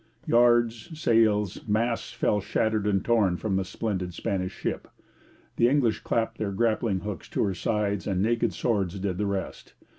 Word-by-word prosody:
Yards, 120 +6 +2
sails, 110 - +2
masts 115 +2 0
fell 105 - 0
shattered 110 +1 0
and 100 -2 +1
torn 105 -7 +2
from 105 -1 -2
the 95 - +1
splendid 95 -2 -3
Spanish 95 -1 -2
ship. - - -4 0.7
The 120 - +4
English 125 -6 +2
clapped 115 0 -1
their 105 -2 -1
grappling 110 -2 0
hooks 105 -1 -6
to - - 0
her 100 -3 0
sides, 100 0 -1
and 95 -2 0
naked 115 +4 +1
swords 100 -5 -1
did 95 -1 -2
the 105 - 0
rest. 100 -1 -5
105 Hz, 160 wpm, -27 LUFS, 95-115 Hz, 0.7 s, The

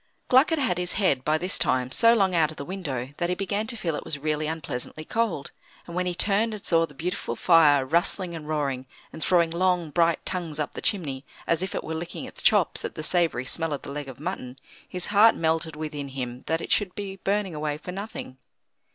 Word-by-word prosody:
Gluck 260 +6 +6
had 325 - +1
had 255 - +1
his 180 0 -2
head, 180 -10 +2
by 155 +2 +2
this 180 +3 0
time, 130 0 +1
so 230 - +5
long 195 -4 +2
out 160 -3 +3
of 155 - -10
the 140 - -6
window 140 -9 -4
that 175 0 -1
he 180 - +1
began 200 +3 -2
to 235 - -2
feel 165 -6 -2
it - - -5
was 145 - -3
really 155 +1 -1
unpleasantly 155 -1 -4
cold, 220 -11 -1 0.3
and 170 - -8
when 180 0 0
he 175 - -1
turned 210 +4 +2
and 205 - -10
saw 165 -1 +3
the 145 - -17
beautiful 180 +6 -3
fire 150 -6 +5
rustling 170 +4 0
and 155 -2 -7
roaring, 140 -4 -2 0.3
and 160 - -5
throwing 170 -1 +3
long, 175 -2 +1
bright 170 +1 +2
tongues 170 -5 -2
up 150 - -2
the - - -6
chimney, 145 -10 +1 0.2
as 165 0 +1
if 190 +1 -3
it - - -2
were 160 - -4
licking 170 +10 -5
its 255 - -8
chops 205 -7 +3
at - - -4
the 155 - -5
savoury 165 -7 +2
smell 165 +3 +1
of 140 - -5
the - - -7
leg 145 -1 -5
of 130 - -10
mutton, 145 -6 -5 0.3
his 180 -1 -4
heart 220 +3 +7
melted 160 -1 0
within 150 -2 -5
him 125 -2 -6
that 160 +1 0
it - - -6
should 195 -4 +1
be 195 -1 -5
burning 195 -1 -1
away 150 -1 -2
for 180 - -7
nothing. 195 -9 -6
165 Hz, 230 wpm, -26 LUFS, 150-190 Hz, 0.3 s, heart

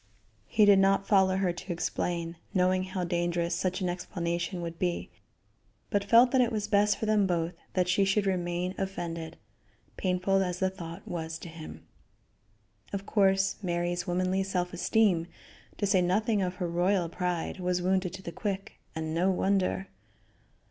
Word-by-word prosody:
He 215 - +4
did 200 -1 +7
not 195 0 +3
follow 190 -2 +4
her 185 -2 +1
to 180 +2 -7
explain, 170 0 -2 0.2
knowing 185 0 +2
how 185 -1 -3
dangerous 175 0 0
such 185 +2 -1
an 185 - 0
explanation 175 0 -3
would 165 0 -6
be, 175 -2 -2 0.8
but 205 -2 +1
felt 235 +4 +6
that 260 - +4
it 240 -1 +2
was 210 -2 -2
best 210 0 +3
for - - -3
them 210 -2 +3
both 170 -1 -1 0.2
that 180 -1 +2
she 185 +2 +3
should 195 +1 +2
remain 180 -1 -1
offended, 170 -4 -4 0.6
painful 185 +1 +1
as 180 -2 -1
the 190 0 0
thought 170 -3 -9
was 160 -1 -4
to 170 - -9
him. 160 -1 -10 1.1
Of 200 0 -4
course, 195 -2 +2
Mary's 175 0 -1
womanly 185 +2 +1
self 180 -2 -2
esteem, 180 -2 +2 0.5
to - - 0
say 190 -2 +3
nothing 205 +4 +1
of 180 -1 -1
her 180 -2 -2
royal 175 +1 +1
pride, 180 +1 -3
was 180 0 0
wounded 185 -1 +1
to 190 0 -8
the 170 - -5
quick, 195 0 -4 0.2
and 160 0 -3
no 175 +3 +2
wonder. 190 0 +1
185 Hz, 165 wpm, -29 LUFS, 175-195 Hz, 1.1 s, did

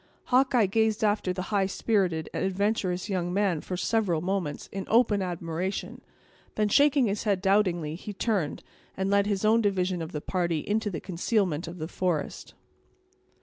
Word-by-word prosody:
Hawkeye 255 -3 +4
gazed 220 +2 +1
after 205 -3 +1
the 185 0 -3
high 195 -2 +3
spirited 190 -6 0
and - - -2
adventurous 190 -1 0
young 180 -4 -1
man 190 -4 +1
for 180 - -5
several 190 -4 +1
moments, 180 -3 -2
in 195 0 -4
open 220 -3 +3
admiration; 175 +1 -4 0.5
then, 210 -1 +1
shaking 285 +2 +4
his 205 +1 -2
head 200 -3 +2
doubtingly, 185 -5 +1
he 185 +5 -7
turned, 200 -6 -1 0.3
and 190 +1 -1
led 200 0 +3
his 205 0 0
own 225 +2 +4
division 185 -4 0
of 160 +1 -5
the 150 - -3
party 170 -2 -2
into 215 +1 0
the 180 - -4
concealment 180 -3 -1
of 170 +2 -7
the 155 -1 -4
forest. 175 -4 -3
190 Hz, 165 wpm, -27 LUFS, 175-210 Hz, 0.5 s, Hawkeye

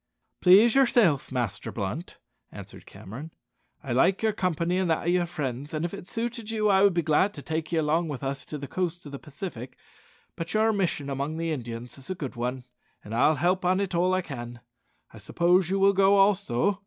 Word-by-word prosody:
"Please 205 +6 +7
yourself, 220 - +3
Master 120 -6 -3
Blunt," 105 - -5 0.3
answered - - -12
Cameron. 130 - -9 0.5
"I 125 - -3
like 185 - +2
your 220 -1 +2
company 180 0 0
and 185 -2 0
that 160 - 0
of 175 - +2
your 175 -1 +1
friends, 145 -3 -4
and 155 +2 -1
if 175 - -5
it 175 - -8
suited 230 0 -4
you 215 -2 +1
I 190 -1 +4
would 200 -3 +4
be 170 - +1
glad 160 +7 +2
to 145 - -9
take 160 +1 -3
you 165 - +1
along 160 +3 +1
with 145 -3 -6
us 135 0 -2
to 150 - -6
the 140 -1 -7
coast 175 0 -3
of 145 - -9
the 140 - -7
Pacific; 145 - -8 0.6
but 165 +4 -5
your 220 +1 +3
mission 180 -8 -1
among 140 +3 -3
the 165 0 -2
Indians 120 -2 -6
is 135 - -11
a 185 - -2
good 140 -7 -6
one, 125 +2 -3 0.4
and 105 - -8
I'll 150 +7 +3
help 180 +5 +1
it 185 +1 +1
on 170 - +2
all 185 +1 +2
I 185 - +1
can. 120 -5 -8 0.5
I - - -11
suppose 175 0 +2
you 195 - +1
will 195 0 +4
go 195 +1 +4
also?" 200 -2 +2
165 Hz, 215 wpm, -26 LUFS, 140-190 Hz, 0.6 s, Please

